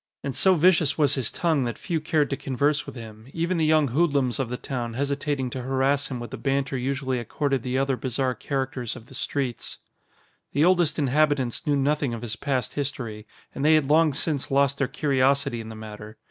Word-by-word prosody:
And 140 -1 -3
so 190 +6 +4
vicious 165 -3 +4
was 145 -3 +3
his 130 -5 -1
tongue 160 -6 +1
that 120 -2 -3
few 165 -3 -2
cared 155 -2 +1
to - - +1
converse 145 +3 0
with - - -8
him, 110 -1 -10
even 170 +2 0
the 160 - +3
young 155 -3 +4
hoodlums 140 -3 +1
of 130 -3 -1
the 125 - -3
town 120 -4 -4
hesitating 140 -1 -1
to 130 - -4
harass 135 +2 +1
him 130 -3 -4
with 120 - -7
the - - -5
banter 135 0 0
usually 130 0 -1
accorded 135 +3 -1
the 125 +2 -2
other 135 0 +1
bizarre 125 +1 -1
characters 130 -1 -3
of 120 -3 -11
the - - -13
streets. 130 -1 -3 0.8
The 145 +4 +3
oldest 175 -3 +3
inhabitants 145 -1 +1
knew 145 - +3
nothing 140 -2 +1
of 115 - -8
his 115 -2 -3
past 130 -4 -2
history, 120 -7 -4 0.3
and 135 - -4
they 155 +1 +6
had 145 -2 +2
long 160 0 +5
since 150 -2 -1
lost 140 0 +2
their 135 - +2
curiosity 140 -3 +1
in 110 - -9
the 110 - -8
matter. 110 0 -9
135 Hz, 205 wpm, -25 LUFS, 125-145 Hz, 0.8 s, they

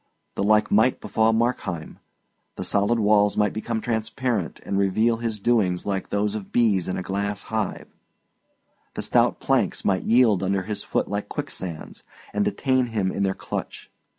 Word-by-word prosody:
The - - -3
like 105 +1 +3
might 110 +5 +3
befall 110 0 +2
Markheim: 110 -8 -2 0.6
the - - -5
solid 100 +4 +2
walls 105 -1 +3
might 105 -2 +2
become 110 +1 -2
transparent 110 -3 -2
and 100 - -1
reveal 110 +4 +2
his 115 -2 -3
doings 100 -5 +1
like 95 -2 -2
those 105 0 0
of 105 -3 -6
bees 105 -7 +2
in 95 - -2
a 95 - -3
glass 100 +2 -2
hive; 110 -3 -2 1.1
the - - -2
stout - - +2
planks - - 0
might 95 -2 +2
yield 115 -5 +4
under 95 0 0
his 105 +1 -4
foot - - -1
like 100 0 -3
quicksands 85 -4 -6 0.3
and 105 - +1
detain 130 +1 +1
him 105 -5 -1
in - - -3
their 95 -1 +1
clutch. - - -6
105 Hz, 165 wpm, -24 LUFS, 100-115 Hz, 1.1 s, yield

